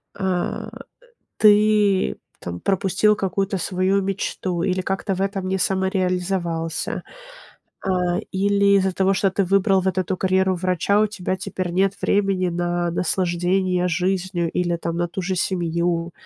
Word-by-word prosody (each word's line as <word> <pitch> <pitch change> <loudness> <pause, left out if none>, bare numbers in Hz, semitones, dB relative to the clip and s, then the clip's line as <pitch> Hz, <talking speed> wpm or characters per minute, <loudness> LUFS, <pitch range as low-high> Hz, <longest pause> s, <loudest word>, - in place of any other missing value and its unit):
а, 190 -3 -2 0.7
ты, 210 -2 +4 0.2
там 85 0 -6
пропустил 195 +2 +2
какую-то 195 0 -1
свою 185 +2 0
мечту 190 -2 -2
или 185 0 0
как-то 195 +1 -2
в 185 - -5
этом 195 -1 -2
не 190 - 0
самореализовался. 180 -3 -1 0.8
А, 180 -2 0
или 200 +1 +3
из-за 190 0 +1
того, 190 +1 +2
что 195 0 +2
ты 195 +1 0
выбрал 195 +1 +3
вот 190 -1 -1
эту 185 0 -1
карьеру 190 0 +2
врача, 185 +3 +1
у 215 - +4
тебя 190 -3 -3
теперь 185 -1 -4
нет 195 +2 +1
времени 195 -2 +1
на 175 0 -1
наслаждение 180 +1 0
жизнью 180 -1 -1
или 175 0 0
там 170 0 -4
на 175 0 -1
ту 185 +2 -5
же 185 +2 -1
семью. 170 -1 -1
185 Hz, 140 wpm, -22 LUFS, 175-195 Hz, 0.8 s, ты